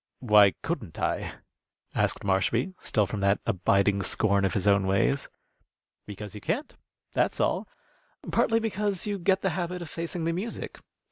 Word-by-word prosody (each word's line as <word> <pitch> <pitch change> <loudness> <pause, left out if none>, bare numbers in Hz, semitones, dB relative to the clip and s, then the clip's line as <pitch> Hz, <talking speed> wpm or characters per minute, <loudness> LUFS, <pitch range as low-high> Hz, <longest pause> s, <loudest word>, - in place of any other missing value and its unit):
"Why 105 -6 +5
couldn't - - -4
I?" - - -1 0.6
asked - - 0
Marshby, 100 - +1
still 105 -3 +1
from 105 +1 -4
that 100 +1 +2
abiding 100 -1 +2
scorn 100 0 +2
of 95 - -1
his 95 - 0
own 100 -1 +4
ways. 100 +8 +1 0.8
"Because 105 0 -8
you 105 - -8
can't, 285 +7 -2 0.4
that's - - +1
all. - - 0 0.6
Partly 225 0 +3
because 210 -3 -2
you 205 -1 -2
get 190 +2 +2
the 190 - +1
habit 180 +1 -3
of 155 - -10
facing 170 0 -4
the 165 +1 0
music. 200 +7 -5
110 Hz, 155 wpm, -27 LUFS, -, 0.8 s, Why